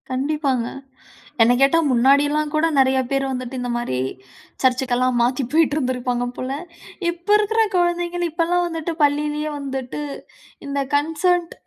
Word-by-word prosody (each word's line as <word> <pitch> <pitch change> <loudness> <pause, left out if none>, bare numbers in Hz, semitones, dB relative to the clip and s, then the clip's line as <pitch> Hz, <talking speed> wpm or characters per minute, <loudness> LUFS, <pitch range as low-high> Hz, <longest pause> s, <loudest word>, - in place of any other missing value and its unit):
கண்டிப்பாங்க, 265 -2 -1 0.8
என்ன 230 +2 +5
கேட்டா, 275 +5 +5
முன்னாடிலாம் 290 +4 +3
கூட 310 +2 +3
நெறையா 265 0 +4
பேர் 275 0 +1
வந்துட்டு, 255 0 -4
இந்த 245 0 -3
மாரி, 240 - -2 0.6
சர்ச்சுக்கெல்லாம் 255 -1 +1
மாத்தி 250 +3 +1
போயிட்டிருந்துருப்பாங்க 255 -6 +1
போல. 255 +1 -4 0.6
இப்ப 345 +2 -12
இருக்கிற 435 +2 +1 0.2
குழந்தைங்கள், 350 0 0
இப்பலாம் 345 +2 +1
வந்துட்டு, 330 0 -4
பள்ளியிலயே 295 +1 +1
வந்துட்டு, 270 -1 -5 0.7
இந்த 280 0 -2
கன்சர்ன்ட் 335 +4 +1
285 Hz, 120 wpm, -21 LUFS, 255-330 Hz, 0.8 s, என்ன